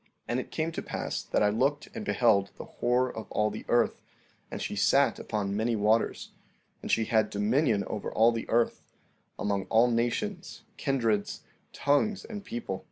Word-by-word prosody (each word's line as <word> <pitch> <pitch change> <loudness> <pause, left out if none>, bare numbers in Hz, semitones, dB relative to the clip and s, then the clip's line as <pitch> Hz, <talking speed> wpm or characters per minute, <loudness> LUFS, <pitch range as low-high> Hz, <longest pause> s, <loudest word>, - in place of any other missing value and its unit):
14:11 - - -35 0.2
And 120 - 0
it - - -6
came 160 +1 -2
to - - -4
pass - - -4
that - - 0
I 105 - +4
looked 135 +7 0
and 225 - -5
beheld 105 - +3
the - - -7
whore 125 +1 0
of 110 - -8
all 105 0 +1
the 105 - -7
earth, 120 0 +2 0.5
and - - -5
she - - -3
sat 125 +6 +3
upon 100 -2 -2
many 115 +2 0
waters; 110 +2 +1 0.5
and - - -7
she 110 - +2
had 110 -1 +2
dominion 105 +1 +1
over 105 - -4
all 115 +2 +5
the 115 -1 -5
earth, 115 0 +1 0.6
among 100 -1 -1
all 115 +2 +4
nations, 175 - -2
kindreds, 115 -7 0 0.3
tongues, 145 +9 +1
and 210 -3 -7
people. 105 - -5
115 Hz, 175 wpm, -29 LUFS, 105-135 Hz, 0.6 s, all